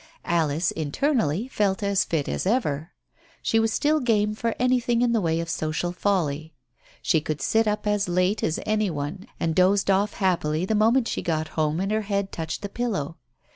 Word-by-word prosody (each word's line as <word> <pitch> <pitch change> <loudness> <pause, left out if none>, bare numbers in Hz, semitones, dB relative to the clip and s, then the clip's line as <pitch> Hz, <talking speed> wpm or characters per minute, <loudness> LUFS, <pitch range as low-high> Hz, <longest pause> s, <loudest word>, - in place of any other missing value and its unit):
Alice, 160 -1 +1
internally, 175 - 0
felt 205 -5 0
as 200 -1 +2
fit 155 -4 -2
as - - -2
ever. 165 - 0 0.5
She 225 - +2
was 225 0 +1
still 305 +4 +2
game 210 -5 +1
for 230 +1 -2
anything 245 -1 +2
in 240 - +2
the 230 -2 +2
way 165 -2 0
of 165 - -3
social 160 +1 -2
folly, 160 -5 -1 0.5
she 160 -4 +2
could 155 0 -3
sit 220 +11 +2
up 210 0 -1
as 205 -2 +1
late 185 +4 +1
as 160 - 0
any 215 -1 +1
one 155 +5 -5
and 165 -1 0
dozed 195 +3 +3
off 200 +2 +2
happily 175 -4 0
the 220 - -1
moment 225 +3 +3
she - - -2
got 160 -2 -1
home 155 +1 0
and 195 +2 -1
her 215 0 +1
head 200 -1 -2
touched 160 +4 -5
the - - -2
pillow. 195 -10 -3
195 Hz, 190 wpm, -25 LUFS, 160-215 Hz, 0.5 s, dozed